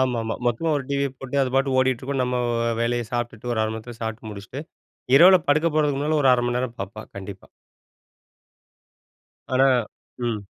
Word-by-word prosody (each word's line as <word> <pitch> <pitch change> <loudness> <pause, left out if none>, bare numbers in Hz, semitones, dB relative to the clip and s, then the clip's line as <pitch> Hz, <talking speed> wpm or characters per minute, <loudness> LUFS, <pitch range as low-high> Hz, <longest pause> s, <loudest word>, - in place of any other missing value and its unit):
ஆமாமா. 115 -3 0
மொத்தமா 120 +8 0
ஒரு 135 - -3
டிவியை 140 -1 0
போட்டு, 135 +1 -5
அது 130 - -1
பாட்டு 135 -1 +1
ஓடிட்டுருக்கும். 130 +1 0
நம்ம 125 0 -1 0.4
வேலையை 120 -1 0
சாப்பிட்டுட்டு 120 -1 -3
ஒரு 110 - 0
1/2 110 - -1
மணி 110 - -4
நேரத்துல 115 +1 -10
சாப்பிட்டு 110 -1 -5
முடிச்சுட்டு, 105 +8 -8 0.5
இரவில 185 +4 +8
படுக்க 155 +3 +3
போறதுக்கு 145 -3 +2
முன்னால 150 +1 +1
ஒரு 130 - +5
1/2 120 - 0
மணி 120 - -1
நேரம் 125 -2 -3
பார்ப்பா, 100 +3 -6
கண்டிப்பா. 95 0 -8 2.1
ஆனா 135 +1 +5 0.6
ம். 110 -3 -2
125 Hz, 165 wpm, -23 LUFS, 115-135 Hz, 2.1 s, இரவில